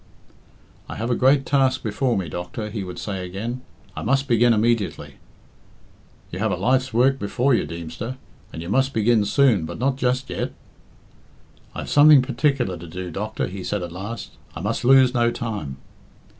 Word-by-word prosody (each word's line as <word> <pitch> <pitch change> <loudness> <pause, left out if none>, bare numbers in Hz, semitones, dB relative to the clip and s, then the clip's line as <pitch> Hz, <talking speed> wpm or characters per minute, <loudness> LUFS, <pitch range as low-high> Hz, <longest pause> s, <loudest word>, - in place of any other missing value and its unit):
"I - - -5
have 115 +3 -2
a - - +2
great 135 +2 +3
task 135 -2 +2
before 115 +3 0
me, 95 -3 -2
doctor," 90 +7 -5
he 105 -2 -4
would 90 -1 -8
say 95 -3 -4
again. 110 +8 -5 0.3
"I - - -5
must 135 0 +1
begin 120 0 +4
immediately." 115 -1 0 1.1
"You - - -5
have - - 0
a - - +1
life's 130 +1 +1
work 130 +4 +3
before 125 +6 +1
you, 115 - +1
Deemster, 85 +10 -6 0.3
and 80 - -7
you 85 - -7
must 135 +5 +1
begin 110 -1 +3
soon, 125 - +3
but 80 - -6
not 130 +2 0
just 130 0 0
yet." - - -3 1.2
"I - - -4
have - - -7
something 145 -2 +7
particular 130 - 0
to 85 - -9
do, 90 +2 -6
doctor," 105 +5 -3
he 95 0 -7
said 100 -1 -2
at 85 - -6
last. 100 +6 -6 0.2
"I 80 - -6
must 105 +6 -2
lose 130 0 +6
no 120 -2 +3
time." 105 - -5
115 Hz, 180 wpm, -23 LUFS, 95-130 Hz, 1.2 s, something